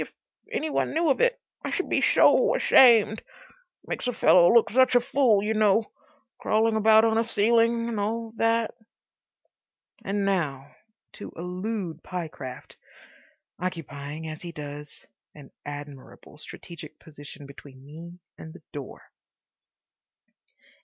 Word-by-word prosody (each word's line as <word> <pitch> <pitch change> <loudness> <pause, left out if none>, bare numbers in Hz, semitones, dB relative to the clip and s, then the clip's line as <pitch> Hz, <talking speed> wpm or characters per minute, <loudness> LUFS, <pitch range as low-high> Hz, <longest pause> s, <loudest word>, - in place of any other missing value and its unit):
If - - -6 0.4
any 315 0 -3
one - - -1
knew 325 -2 +2
of - - 0
it—I - - -2
should 375 - -2
be - - 0
so - - +4
ashamed.... 230 - +5 0.6
Makes - - -4
a 245 - -1
fellow 175 -5 +5
look 230 -1 +4
such 255 +2 +3
a - - +7
fool, 240 -5 +2
you 215 +1 -1
know. 215 0 +2 0.5
Crawling 220 +1 +1
about 220 +1 +5
on 225 0 +2
a - - +2
ceiling 230 +1 +2
and 225 -3 -3
all 225 +2 -3
that...." 230 0 +1 1.3
And 200 0 -2
now 145 -8 -2 0.4
to - - -9
elude 180 -1 -5
Pyecraft, 155 -8 -8 0.8
occupying, 160 -3 -6
as 155 0 -7
he 175 - -7
does, 150 -1 -9 0.3
an 145 -3 -14 0.2
admirable 145 0 -10
strategic 160 -1 -10
position 145 -2 -13
between 140 -1 -14
me 165 +4 -11 0.2
and 160 - -10
the - - -15
door. 140 -3 -9
195 Hz, 130 wpm, -25 LUFS, 155-230 Hz, 1.3 s, a